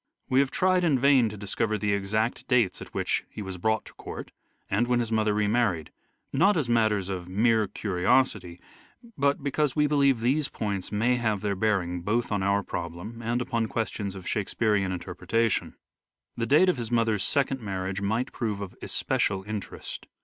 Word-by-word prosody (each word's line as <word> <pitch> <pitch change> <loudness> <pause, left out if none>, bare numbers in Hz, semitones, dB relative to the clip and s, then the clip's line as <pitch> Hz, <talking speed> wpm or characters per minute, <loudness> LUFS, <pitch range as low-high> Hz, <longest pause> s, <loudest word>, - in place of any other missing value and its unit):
We 130 - +4
have 140 -1 +3
tried 185 +4 +2
mother. 140 -6 +3
in 130 -5 +5
vam - - -2
to 105 - -8
discover 105 +2 -1
the 105 0 0
exact 110 +4 -1
dates 120 -7 +2
at - - -9
which - - -1
he 105 - -7
was 95 -2 -6
brought 110 +3 0
to - - -13
court, - - -8 0.4
and 110 +5 +1
when 125 0 +2
his 115 -2 -2
mother 110 -1 +2
remarried, 105 -6 +1 0.4
not 195 +2 +4
as 150 -6 0
matters 110 -5 +2
of 90 -2 -4
mere 110 +2 +3
curiosity, 95 -1 0 0.6
but 140 0 +1
because 145 0 0
we 150 -1 +3
believe 140 -4 +3
these 135 +5 +1
points 100 -4 -3
may 115 +4 +2
have 110 -4 0
their 100 -1 -1
bearing 95 -4 0
both 115 +6 -1
on 100 -2 0
our 100 +1 +2
problem 90 +7 -6
and 120 +2 -1
upon 115 -3 -1
questions 105 -3 -3
of 95 -2 -9
Shakespearean 105 -2 0
inter 90 0 -5
pretation. 110 +5 0 0.6
The 115 0 -2
date 155 +7 +5
of 180 - +2
his 115 -2 -4
mother's 115 -4 +1
second 135 -2 +1
marriage 95 -1 -3
might 110 +6 -1
prove 110 -4 -2
of 100 -2 -7
especial 95 -1 0
interest. 105 -1 -6
110 Hz, 185 wpm, -27 LUFS, 100-120 Hz, 0.6 s, in